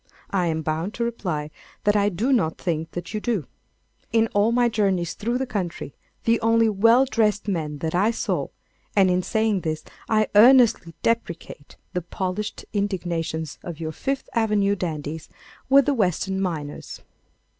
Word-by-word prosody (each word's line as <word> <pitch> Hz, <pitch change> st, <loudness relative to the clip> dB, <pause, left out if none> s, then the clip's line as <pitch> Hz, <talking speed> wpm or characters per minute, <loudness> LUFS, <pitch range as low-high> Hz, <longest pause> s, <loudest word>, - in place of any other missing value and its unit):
I 185 Hz, -3 st, +1 dB
am 160 Hz, -1 st, -1 dB
bound 160 Hz, +6 st, -2 dB
to 235 Hz, -, -1 dB
reply 175 Hz, -10 st, -3 dB, 0.3 s
that 205 Hz, 0 st, +3 dB
I 205 Hz, 0 st, +3 dB
do 220 Hz, +9 st, 0 dB
not 160 Hz, -10 st, +1 dB
think 165 Hz, -3 st, -2 dB
that 175 Hz, -, -6 dB
you 215 Hz, -, -1 dB
do. 210 Hz, -, -1 dB, 0.7 s
In 225 Hz, 0 st, +3 dB
all 205 Hz, +3 st, +3 dB
my 240 Hz, 0 st, +3 dB
journeys 195 Hz, -7 st, 0 dB
through 235 Hz, +3 st, -2 dB
the 265 Hz, -, -1 dB
country, 180 Hz, -, -4 dB, 0.3 s
the 230 Hz, 0 st, +2 dB
only 230 Hz, 0 st, +4 dB
well 230 Hz, +5 st, +5 dB
dressed 215 Hz, -5 st, +1 dB
men 155 Hz, -6 st, -2 dB
that 160 Hz, -, -2 dB
I 195 Hz, +5 st, +3 dB
saw—and 195 Hz, -4 st, -1 dB
in 180 Hz, 0 st, +2 dB
saying 220 Hz, 0 st, 0 dB
this 155 Hz, -1 st, -3 dB, 0.3 s
I 215 Hz, -1 st, +3 dB
earnestly 230 Hz, -, +6 dB
deprecate 170 Hz, -9 st, -3 dB, 0.2 s
the 180 Hz, -, -1 dB
polished 185 Hz, +4 st, -4 dB
indignation 175 Hz, -6 st, -2 dB, 0.2 s
of 170 Hz, -3 st, -7 dB
your 160 Hz, -1 st, -3 dB
Fifth 270 Hz, -, -3 dB
Avenue 210 Hz, -3 st, +2 dB
dandies—were 160 Hz, -, -1 dB
the 285 Hz, -, +1 dB
Western 190 Hz, -, 0 dB
miners. 155 Hz, -6 st, -4 dB
200 Hz, 155 wpm, -24 LUFS, 170-225 Hz, 0.7 s, earnestly